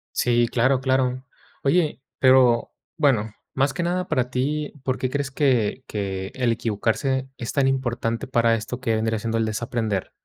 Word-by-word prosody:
Sí, 120 -1 +3
claro, 125 +2 +2
claro. 130 -1 +1 0.4
Oye, 150 -1 +1 0.2
pero, 130 -3 +5 0.3
bueno, 120 -9 +2 0.2
más 135 +1 +1
que - - -3
nada 180 +1 -1
para 125 -5 +1
ti, 145 +4 -1
¿por 130 -1 -1
qué 130 - -1
crees 140 0 -2
que 130 -4 +1
que 95 -2 -4
el 125 -3 +1
equivocarse 120 +4 -1
es 120 - -5
tan 140 -1 +3
importante 120 -3 -1
para 115 -2 +3
esto 115 +3 -5
que 115 -3 +1
vendría 110 0 0
siendo 115 +1 -2
el 115 - +1
desaprender? 110 -2 -2
125 Hz, 165 wpm, -23 LUFS, 115-135 Hz, 0.4 s, pero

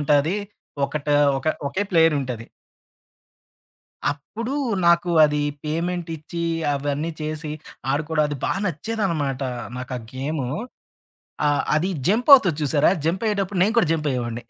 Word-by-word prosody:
ఉంటాది 150 +5 +2 0.5
ఒకటా 145 0 -1 0.2
ఒక 135 - -2 0.2
ఒకే 190 +8 -1
ప్లేయరుంటది. 145 -9 +2 1.7
అప్పుడు 225 - -6 0.3
నాకు 170 +1 +4
అది 150 0 +1 0.2
పేమెంట్టిచ్చి 165 0 -3 0.3
అవన్నీ 145 +3 -2
చేసి, 155 0 -4 0.4
ఆడుకోవడం 150 +2 +1
అది 145 - -3
బా - - +1
నచ్చేదన్నమాట. 165 - -2 0.4
నాకా 130 0 -5 0.2
గేము 135 0 -3 1.0
ఆహ్, 145 -1 +2
అది 165 +5 +1 0.2
జంప్పవుతది 220 - +6
చూసారా! 145 +1 +3 0.2
జంపయ్యేటప్పుడు 195 +1 0
నేను 215 +4 +1
కూడా 185 -8 +4
జంపయ్యేవాడిని. 125 -6 -2
155 Hz, 105 wpm, -23 LUFS, 145-180 Hz, 1.7 s, జంప్పవుతది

